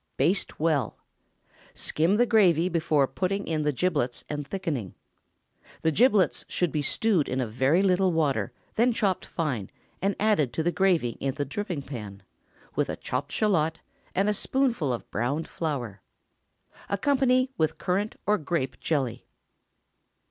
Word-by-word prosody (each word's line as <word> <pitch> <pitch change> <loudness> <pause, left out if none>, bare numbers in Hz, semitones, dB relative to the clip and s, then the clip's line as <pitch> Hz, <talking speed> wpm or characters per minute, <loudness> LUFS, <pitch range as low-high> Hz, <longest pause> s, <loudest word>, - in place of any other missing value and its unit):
Baste 185 +3 +1
well. 155 -4 +1 0.8
Skim 165 +6 +2
the 245 - +5
gravy 185 -7 +4
before 155 -5 +2
putting 195 +7 -2
in 155 -2 -1
the 150 0 +1
giblets 145 -5 -1
and 145 -1 -4
thickening. 150 - -3 0.9
The 160 - +3
giblets 190 - +3
should 175 -4 0
be 150 - 0
stewed 185 +1 +1
in 130 - -1
a 130 - +1
very 130 - +2
little 190 -1 +3
water, 150 -6 0 0.2
then 240 +2 +3
chopped 195 -4 0
fine, 130 - -2 0.3
and 195 +2 +1
added 200 - +2
to 160 - -1
the 175 - +2
gravy 175 -10 +1
in 135 -1 -2
the 145 - -2
dripping 175 0 -4
pan, 105 -8 -8 0.5
with - - 0
a - - -2
chopped 135 +3 -4
shallot 165 -7 +1 0.4
and 195 +2 +2
a 210 - +3
spoonful 235 - 0
of 120 - -4
browned 135 +9 -1
flour. 125 - -4 0.9
Accompany 255 +3 +2
with 160 -7 0
currant 200 +4 -1
or 210 0 +2
grape 145 -4 -2
jelly. 130 -6 -2
160 Hz, 150 wpm, -27 LUFS, 135-195 Hz, 0.9 s, the